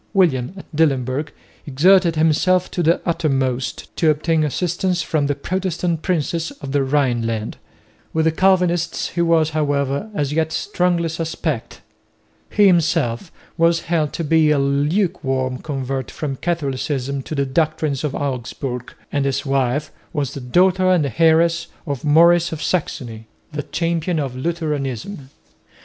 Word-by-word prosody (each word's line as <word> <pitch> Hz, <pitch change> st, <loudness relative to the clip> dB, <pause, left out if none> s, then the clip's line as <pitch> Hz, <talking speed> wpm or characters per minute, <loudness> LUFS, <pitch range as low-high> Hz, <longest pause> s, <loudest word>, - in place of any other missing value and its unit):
William 165 Hz, -5 st, +2 dB
at 190 Hz, -, -9 dB
Dillenburg 140 Hz, -1 st, +1 dB, 0.4 s
exerted 170 Hz, +5 st, +4 dB
himself 165 Hz, +4 st, +2 dB
to 175 Hz, -, -1 dB
the 170 Hz, +1 st, +3 dB
uttermost 135 Hz, -6 st, -1 dB
to 160 Hz, -, +3 dB
obtain 155 Hz, +1 st, +1 dB
assistance 175 Hz, +3 st, -1 dB
from 150 Hz, -3 st, 0 dB
the 145 Hz, -, 0 dB
Protestant 175 Hz, -2 st, -2 dB
princes 165 Hz, -2 st, -1 dB
of 140 Hz, -3 st, -6 dB
the 140 Hz, 0 st, +2 dB
Rhineland. 120 Hz, -6 st, 0 dB, 0.5 s
With 160 Hz, 0 st, +1 dB
the 160 Hz, -, +4 dB
Calvinists 175 Hz, -1 st, +1 dB
he 170 Hz, -, -2 dB
was, 165 Hz, -2 st, +3 dB
however, 145 Hz, +3 st, -1 dB
as 145 Hz, -4 st, -1 dB
yet 160 Hz, 0 st, 0 dB
strongly 175 Hz, -1 st, 0 dB
suspect. 160 Hz, -5 st, -4 dB, 0.7 s
He 210 Hz, -, +4 dB
himself 165 Hz, -5 st, +2 dB, 0.3 s
was 165 Hz, 0 st, +3 dB
held 160 Hz, -3 st, 0 dB
to 170 Hz, -, -3 dB
be 160 Hz, 0 st, +3 dB
a 150 Hz, -, +3 dB
lukewarm 140 Hz, -3 st, 0 dB
convert 135 Hz, -3 st, -4 dB
from 140 Hz, -3 st, -4 dB
Catholicism 140 Hz, -4 st, -2 dB
to 155 Hz, -, -6 dB
the 140 Hz, -1 st, +1 dB
doctrines 155 Hz, 0 st, 0 dB
of 150 Hz, -3 st, -2 dB
Augsburg; 125 Hz, -2 st, -4 dB, 0.2 s
and 145 Hz, -1 st, 0 dB
his 135 Hz, +1 st, -1 dB
wife 135 Hz, +2 st, 0 dB, 0.2 s
was 145 Hz, -3 st, -2 dB
the 140 Hz, -, -6 dB
daughter 185 Hz, +8 st, +3 dB
and 155 Hz, -9 st, +2 dB
heiress 165 Hz, +1 st, +4 dB, 0.2 s
of 140 Hz, -5 st, -4 dB
Maurice 170 Hz, +3 st, +5 dB
of 160 Hz, -1 st, -5 dB
Saxony, 120 Hz, -10 st, -3 dB, 0.2 s
the 150 Hz, -1 st, -3 dB
champion 165 Hz, +2 st, -1 dB
of 135 Hz, -4 st, -2 dB
Lutheranism. 145 Hz, -, -3 dB
155 Hz, 140 wpm, -20 LUFS, 135-170 Hz, 0.7 s, Maurice